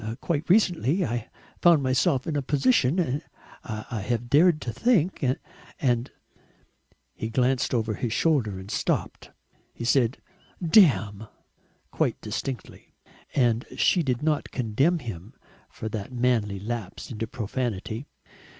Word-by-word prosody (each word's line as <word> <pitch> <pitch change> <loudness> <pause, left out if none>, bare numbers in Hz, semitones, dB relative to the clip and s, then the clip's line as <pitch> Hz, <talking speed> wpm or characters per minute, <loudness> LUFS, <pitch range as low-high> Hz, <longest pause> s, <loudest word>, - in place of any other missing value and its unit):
Quite 165 +1 -2
recently 180 - +3
I 120 -1 -3 0.3
found 170 -5 +5
myself 130 0 +2
in 160 -3 -2
a 145 - +1
position 145 - +2 0.4
I 110 0 -5
have 120 +3 -2
dared 160 +2 +5
to 120 - -4
think. 190 -10 +1 0.6
And 125 -2 +1 0.5
" - - -40
He 110 - -5
glanced 125 +2 +1
over 110 -3 0
his 115 +2 -3
shoulder 120 - +1
and 95 +2 -8
stopped. - - -2 0.5
He 115 - -5
said 125 0 +2 0.4
"Damn!" 135 - +4 0.6
quite - - 0
distinctly 130 -3 -6 0.4
and 120 -3 +2
she 180 - +3
did 130 -3 -1
not 155 -1 0
condemn 135 +9 +1
him 110 - -8 0.3
for 110 - -7
that 105 +1 -5
manly 120 -5 +1
lapse 110 0 -5
into 115 -1 -4
profanity. 115 +1 -4
125 Hz, 125 wpm, -26 LUFS, 110-150 Hz, 0.6 s, found